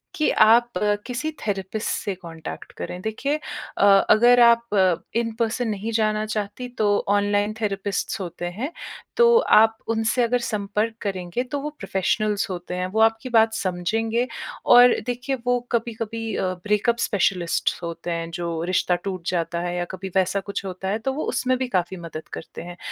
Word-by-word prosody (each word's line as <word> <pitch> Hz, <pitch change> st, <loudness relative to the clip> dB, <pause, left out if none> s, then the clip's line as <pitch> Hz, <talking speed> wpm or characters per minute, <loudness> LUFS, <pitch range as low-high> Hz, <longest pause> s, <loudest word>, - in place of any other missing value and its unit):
कि 305 Hz, -, +2 dB
आप 235 Hz, +2 st, +6 dB, 0.4 s
किसी 255 Hz, +5 st, -2 dB, 0.2 s
थेरेपिस्ट 200 Hz, +1 st, -2 dB
से 200 Hz, -, -2 dB
कॉन्टैक्ट 165 Hz, -3 st, -9 dB
करें। 180 Hz, -, -5 dB
देखिए 225 Hz, +8 st, -1 dB
अ, 300 Hz, -8 st, -3 dB, 0.2 s
अगर 240 Hz, +3 st, +6 dB
आप 235 Hz, 0 st, +5 dB, 0.5 s
इन-पर्सन 230 Hz, +1 st, -1 dB
नहीं 215 Hz, +2 st, -3 dB
जानना 215 Hz, -1 st, +1 dB
चाहती 215 Hz, +3 st, -4 dB
तो 215 Hz, -, +2 dB, 0.2 s
ऑनलाइन 205 Hz, +1 st, +2 dB
थेरेपिस्ट्स 200 Hz, -1 st, -2 dB
होते 175 Hz, -1 st, -5 dB
हैं। 215 Hz, -, -4 dB, 0.5 s
तो 470 Hz, 0 st, +6 dB
आप 225 Hz, -, +5 dB
उनसे 225 Hz, +2 st, +1 dB
अगर 245 Hz, +1 st, +1 dB
संपर्क 215 Hz, 0 st, -2 dB
करेंगे 190 Hz, +3 st, -3 dB
तो 280 Hz, +3 st, -4 dB
वो 295 Hz, +2 st, -4 dB
प्रोफेशनल्स 200 Hz, +1 st, 0 dB
होते 180 Hz, 0 st, -5 dB
हैं, 180 Hz, 0 st, -2 dB
वो 215 Hz, +4 st, -2 dB
आपकी 225 Hz, +2 st, +2 dB
बात 225 Hz, -2 st, +4 dB
समझेंगे 220 Hz, +6 st, -1 dB, 0.4 s
और 245 Hz, 0 st, +8 dB
देखिए 245 Hz, +2 st, -2 dB
वो 245 Hz, 0 st, +2 dB
कभी-कभी 225 Hz, -1 st, -2 dB
अ, -, -, -1 dB, 0.2 s
ब्रेकअप 210 Hz, +3 st, +1 dB
स्पेशलिस्ट्स 180 Hz, -5 st, 0 dB
होते 170 Hz, +1 st, -5 dB
हैं 165 Hz, 0 st, -3 dB
जो 170 Hz, -1 st, -3 dB
रिश्ता 180 Hz, 0 st, +1 dB
टूट 185 Hz, -3 st, -4 dB
जाता 170 Hz, -1 st, -1 dB
है 175 Hz, 0 st, -3 dB
या 175 Hz, -, -1 dB
कभी 190 Hz, +1 st, -6 dB
वैसा 190 Hz, +1 st, +2 dB
कुछ 200 Hz, 0 st, -5 dB
होता 190 Hz, 0 st, -5 dB
है 210 Hz, +3 st, -1 dB
तो 265 Hz, +4 st, -2 dB
वो 305 Hz, -, -3 dB
उसमें 255 Hz, 0 st, +1 dB
भी 260 Hz, 0 st, -2 dB
काफ़ी 185 Hz, -4 st, -1 dB
मदद 165 Hz, -2 st, -8 dB
करते -, -, -8 dB
हैं। 175 Hz, +1 st, -9 dB
215 Hz, 165 wpm, -23 LUFS, 185-235 Hz, 0.5 s, और